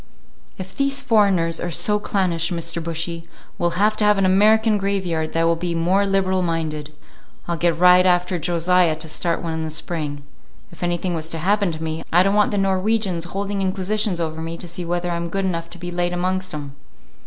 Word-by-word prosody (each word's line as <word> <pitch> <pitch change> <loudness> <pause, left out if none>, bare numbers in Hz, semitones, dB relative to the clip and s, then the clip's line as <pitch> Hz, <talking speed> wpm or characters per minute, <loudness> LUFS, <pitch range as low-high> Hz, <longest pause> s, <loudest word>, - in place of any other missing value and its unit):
"If 190 0 -8
these 275 0 0
foreigners 195 -9 +2
are 175 - -3
so 210 +7 +1
clannish, 180 -5 0
Mr. 170 -1 -3
Bushy, 165 0 -4 0.4
we'll 175 0 0
have 210 +2 +3
to - - +1
have 210 -1 +4
an 195 - +2
American 215 +3 +4
graveyard 185 -5 -1
that 165 - +1
will 165 0 +3
be 170 0 -3
more 185 +4 +2
liberal 190 -1 +1
minded. 160 -3 -2 0.6
I'll 170 - -1
get 170 0 +1
right 180 +1 +6
after 180 0 +2
Josiah 175 0 +2
to 160 +1 -7
start 165 +3 -2
one 165 -1 -3
in 160 0 -3
the 160 - -3
spring. 150 -2 -4 0.5
If 170 - -15
anything 175 +1 -1
was 160 -1 -3
to 165 - -4
happen 200 +3 +1
to 160 0 -6
me, 160 0 -3
I 175 +2 +5
don't 195 +1 +2
want 210 0 +3
the 205 - -2
Norwegians 195 -2 0
holding 195 +2 -3
inquisitions 195 0 0
over 160 -1 -3
me 165 +1 -5
to 175 - -8
see 170 +1 -6
whether 175 +1 -2
I'm 170 0 -3
good 195 +3 -2
enough 170 -2 -2
to 175 - -10
be 175 0 -6
laid 175 0 -1
amongst 185 +1 -1
'em." 145 -2 -7
175 Hz, 205 wpm, -21 LUFS, 165-195 Hz, 0.6 s, right